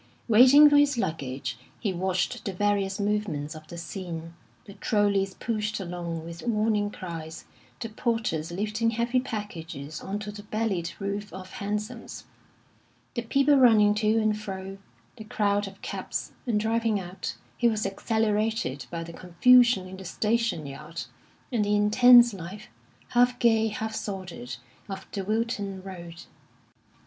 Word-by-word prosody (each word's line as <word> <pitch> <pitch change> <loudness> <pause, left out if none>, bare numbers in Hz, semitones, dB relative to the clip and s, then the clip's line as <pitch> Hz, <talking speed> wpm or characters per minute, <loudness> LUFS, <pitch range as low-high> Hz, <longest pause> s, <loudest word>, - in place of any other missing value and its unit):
Waiting 255 +6 +8
for 290 0 +5
his 290 -2 +4
luggage, 135 - -3 0.2
he 200 -4 -1
watched 185 0 -1
the 195 - -2
various 200 0 0
movements 200 -8 -1
of 155 -1 -11
the 170 - -9
scene 170 -1 -6 0.3
the 200 - -11
trollies 200 -3 +1
pushed 215 -2 -2
along 170 -3 -5
with 170 +1 -8
warning 215 -2 +1
cries, 165 -5 -7 0.3
the 230 - -3
porters 220 -8 -1
lifting 215 +5 0
heavy 235 +2 +1
packages 165 - -6
on 195 +2 -3
to 210 0 -6
the 205 0 -9
bellied 205 -5 -2
roof 200 +1 -4
of 185 0 -9
hansoms, 210 +1 -5 0.9
the 235 - -2
people 275 +5 +3
running 220 -5 +6
to 215 +1 +2
and 215 -1 +1
fro, 195 -1 -6 0.4
the 220 - -8
crowd 205 -1 0
of 195 0 -13
cabs; - - -4 0.2
and 220 -3 +2
driving 225 -1 +1
out, 180 0 -6 0.2
he 240 - +2
was 215 -2 0
exhilarated 215 - 0
by 165 +3 -4
the 165 0 -9
confusion 235 +4 +4
in 190 +1 -9
the 190 - -9
station 215 -3 0
yard, 150 +4 -7 0.5
and 230 -4 +1
the 205 0 +2
intense 240 +3 +7
life, 195 +4 -8 0.4
half 245 0 +3
gay, 225 -2 +3
half 220 +1 -4
sordid, 180 - -5 0.3
of 195 - -6
the 195 - -3
Wilton 205 -2 -2
Road. 175 -3 -9
205 Hz, 145 wpm, -27 LUFS, 180-225 Hz, 0.9 s, Waiting